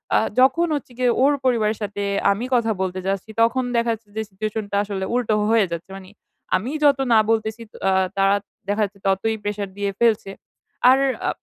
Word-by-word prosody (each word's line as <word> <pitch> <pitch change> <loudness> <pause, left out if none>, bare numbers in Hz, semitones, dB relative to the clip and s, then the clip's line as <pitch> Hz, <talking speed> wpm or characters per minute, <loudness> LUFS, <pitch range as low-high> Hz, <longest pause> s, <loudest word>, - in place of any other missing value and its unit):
আ - - +6 0.2
যখন 330 +7 +4
হচ্ছে 280 -3 -6
গিয়ে 250 -1 +2
ওর 285 +2 +5
পরিবারের 220 -4 +2
সাথে 205 0 -3 0.3
আমি 205 +5 -2
কথা 230 -2 +2
বলতে 185 0 -2
যাচ্ছি, 195 +2 -2
তখন 235 +3 +3
দেখা 235 0 +2
যাচ্ছে 220 -1 -11
যে - - 0
সিচুয়েশন 215 +2 -4
টা - - -1
আসলে 200 -2 -4
উল্টো 240 -3 +1 0.2
হয়ে 225 -3 +4
যাচ্ছে, 170 +2 -5
মানি 190 0 -13 0.4
আমি 210 +8 -2
যত 280 -2 +5
না 220 - +7
বলতেছি 220 0 -1
তো - - -13
আ - - +3 0.3
তারা, 195 +1 +4 0.3
দেখা 205 +2 0
যাচ্ছে 200 0 -12
ততই 195 +4 +1
প্রেশার 205 -1 -3
দিয়ে 200 -1 -1
ফেলছে। 220 -4 +2 0.6
আর 260 +1 +6 0.3
আ - - +2
215 Hz, 195 wpm, -22 LUFS, 200-235 Hz, 0.6 s, না